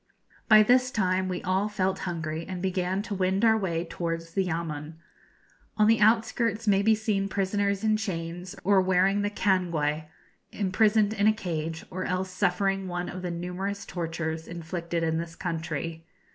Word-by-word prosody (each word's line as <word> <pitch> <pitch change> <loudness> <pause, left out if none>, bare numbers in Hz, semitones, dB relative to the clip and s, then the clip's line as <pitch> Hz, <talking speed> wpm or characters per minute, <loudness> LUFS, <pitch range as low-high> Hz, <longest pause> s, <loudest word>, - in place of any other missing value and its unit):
By 215 -1 +9
this 250 +3 +4
time 185 -4 0
we 180 -1 -3
all 190 +3 +1
felt 190 -2 -1
hungry, 160 -1 -3
and 185 -1 -5
began 185 +1 -1
to 215 - -5
wend 190 +2 +1
our 220 -1 +6
way 175 -5 -1
towards 165 -1 -4
the 195 +2 +1
yamun. 160 -3 -4 0.8
On 215 - +5
the 225 +1 +4
outskirts 225 0 +2
may 200 -1 +4
be 220 +2 +4
seen 210 -2 -1
prisoners 200 +1 0
in 215 -1 +3
chains, 180 -2 -5
or 195 0 +4
wearing 190 +2 +3
the 205 - 0
cangue, 170 -7 0 0.5
imprisoned 210 +1 +2
in 205 -1 +2
a 215 - +6
cage, 165 -5 -4
or 185 +1 -3
else 185 +1 -2
suffering 195 +1 0
one 175 0 -3
of 185 - -6
the 180 - -3
numerous 180 +4 -4
tortures 165 -2 -4
inflicted 170 0 -4
in 160 0 +1
this 165 0 -6
country. 165 -2 -4
185 Hz, 165 wpm, -27 LUFS, 170-205 Hz, 0.8 s, By